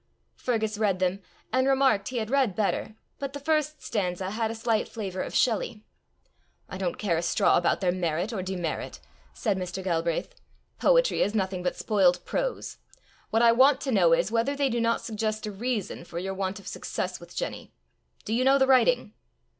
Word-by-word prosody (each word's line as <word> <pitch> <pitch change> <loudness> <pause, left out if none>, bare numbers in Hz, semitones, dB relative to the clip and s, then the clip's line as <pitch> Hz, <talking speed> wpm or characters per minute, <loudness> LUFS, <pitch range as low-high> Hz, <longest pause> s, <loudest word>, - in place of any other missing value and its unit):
Fergus 220 -3 -1
read 205 -4 +2
them, 185 +2 0 0.3
and 260 +1 +3
remarked 265 -7 +3
he 255 - -4
had 220 0 -2
read 265 -9 +2
better, 215 0 -1 0.2
but 275 -1 -4
the 285 - -5
first 305 +1 0
stanza 185 -3 -2
had 220 +1 -1
a 225 - -4
slight 225 -1 0
flavour 195 -5 -4
of - - -5
Shelley. 225 -2 +1 0.8
"I 190 - -7
don't 180 -3 -2
care 175 -6 0
a - - 0
straw 170 - +3
about 175 - +2
their 180 -2 +2
merit 175 +4 -1
or 195 - -2
demerit," 180 -3 -4 0.4
said 205 -5 0
Mr. 185 +1 -4
Galbraith; 170 -2 -1 0.5
"poetry - - +3
is 205 - +1
nothing 190 -3 -1
but 180 - -1
spoilt 185 -5 +2
prose. - - -3 0.5
What 225 +2 +2
I 235 - +7
want 260 +3 +5
to 275 - -2
know 180 -7 +4
is, 165 - +2
whether 235 +5 +1
they 280 -1 +1
do 235 -1 0
not 230 0 +1
suggest 215 -1 -3
a 210 - -4
reason 215 -2 -3
for 170 - -9
your 190 +2 -3
want 190 0 -3
of 195 - -14
success - - -4
with - - -13
Jenny. - - -4 0.5
Do 215 - -2
you 245 +3 +2
know 270 +1 +5
the 265 - +4
writing?" 265 - +3
215 Hz, 195 wpm, -27 LUFS, 185-255 Hz, 0.8 s, I